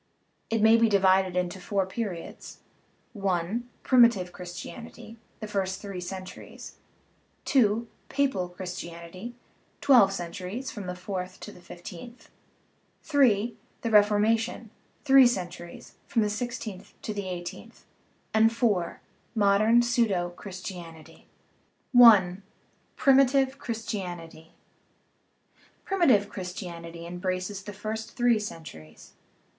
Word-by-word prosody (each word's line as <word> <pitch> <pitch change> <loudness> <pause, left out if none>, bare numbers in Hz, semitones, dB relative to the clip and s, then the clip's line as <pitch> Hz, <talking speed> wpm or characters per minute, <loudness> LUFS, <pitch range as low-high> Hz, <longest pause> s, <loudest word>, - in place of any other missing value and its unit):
It 225 -1 +1
may 220 +1 +7
be 230 -1 +4
divided 190 -2 +3
into 180 +1 -2
four 195 0 0
periods: 190 -3 -6 0.7
(i) 185 +3 0 0.2
primitive 235 -8 +4
Christianity 225 +6 -9 0.2
(the 215 - -4
first 190 -2 -2
three 195 -3 -6
centuries), 185 +1 -9 0.7
(2) 230 -3 +2 0.2
papal 265 -11 0
Christianity 180 +3 -8 0.4
(twelve 245 -9 +6
centuries, 185 +7 -5
from 200 -4 -7
the 180 - -4
fourth 185 0 -5
to - - -8
the 180 - -15
fifteenth), 180 +7 -11 0.7
(3) 235 -7 +3 0.3
the 230 - -1
Ref 210 -1 +6
ormation 225 +2 0 0.4
(three 270 -2 +8
centuries, 180 -6 -5
from 225 - +1
the 210 - 0
sixteenth 210 -3 -6
to 215 - -3
the 200 -2 -4
eighteenth), 180 +6 -8 0.5
and 220 +1 +5
(4) 220 -7 0 0.3
modern 215 +3 +4
pseudo 225 -8 +1
Christianity. 175 -3 -10 0.7
I. 205 -7 +8 0.6
PRIMITIVE 270 0 +4
CHRISTIANITY 180 -8 -6 1.3
Primitive 275 - +3
Christianity 170 -3 -7
embraces 185 +3 -3
the 205 +1 -8
first 220 +2 -5
three 240 -2 +3
cen 205 -6 -6
turies. 80 - -13
200 Hz, 105 wpm, -27 LUFS, 180-230 Hz, 1.3 s, three